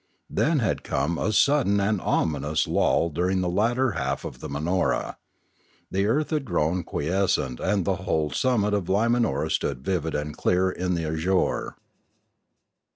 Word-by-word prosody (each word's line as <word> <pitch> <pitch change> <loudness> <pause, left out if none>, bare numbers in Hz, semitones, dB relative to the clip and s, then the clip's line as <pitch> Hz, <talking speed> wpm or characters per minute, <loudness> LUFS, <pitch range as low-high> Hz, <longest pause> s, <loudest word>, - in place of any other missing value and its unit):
Then 160 0 +2
had 110 -8 0
come 85 0 -1
a 110 - 0
sud 140 +5 +3
den 100 0 +2
and 100 -1 0
ominous 75 -1 0
lull 85 - +2
during 90 +4 0
the 90 - -1
latter 120 +8 +1
half 90 - -3
of - - -7
the - - -7
Man 70 +3 -3
or 90 0 +2
a; - - -4 0.7
the 100 +2 +1
earth 145 +9 0
had 155 -3 0
grown 85 - 0
quiescent 80 -6 -1
and 100 -4 0
the - - 0
whole 75 -2 -1
summit 105 - +1
of 100 -3 0
Limanora 115 - +1
stood 65 -2 -2
vivid 85 -4 -1
and 75 0 -3
dear 90 +1 +1
in 90 0 -2
the 85 -1 -2
azure. 80 +4 0
95 Hz, 165 wpm, -25 LUFS, 80-105 Hz, 0.7 s, sud